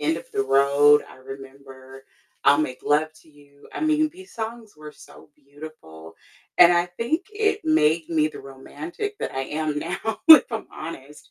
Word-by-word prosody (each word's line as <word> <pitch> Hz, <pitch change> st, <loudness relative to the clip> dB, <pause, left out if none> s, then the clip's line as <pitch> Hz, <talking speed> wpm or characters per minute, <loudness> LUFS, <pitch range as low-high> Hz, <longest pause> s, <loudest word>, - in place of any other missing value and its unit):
End 155 Hz, +2 st, 0 dB
Of -, -, -11 dB
The -, -, 0 dB
Road. 140 Hz, +2 st, +4 dB
I -, -, -15 dB
remember 135 Hz, 0 st, -13 dB, 0.4 s
I'll 140 Hz, -, +5 dB
Make 130 Hz, -5 st, -3 dB
Love 155 Hz, +2 st, +1 dB
To 160 Hz, -, -24 dB
You. 145 Hz, -1 st, -21 dB
I -, -, -5 dB
mean, 310 Hz, 0 st, +1 dB
these 375 Hz, +2 st, -16 dB
songs 225 Hz, -1 st, -7 dB
were 150 Hz, 0 st, -12 dB
so -, -, -17 dB
beautiful, 140 Hz, -, -14 dB, 0.4 s
and 175 Hz, 0 st, +7 dB
I 175 Hz, 0 st, +1 dB
think 235 Hz, -, -3 dB
it 425 Hz, 0 st, -1 dB
made 165 Hz, -, +1 dB
me 155 Hz, -2 st, +1 dB
the -, -, -11 dB
romantic 150 Hz, -, -8 dB
that -, -, -5 dB
I 135 Hz, -, -4 dB
am 150 Hz, 0 st, -3 dB
now, 190 Hz, +7 st, -5 dB
if 315 Hz, -4 st, +9 dB
I'm 225 Hz, -2 st, -6 dB
honest. 150 Hz, -2 st, -11 dB
155 Hz, 175 wpm, -23 LUFS, 140-220 Hz, 0.4 s, if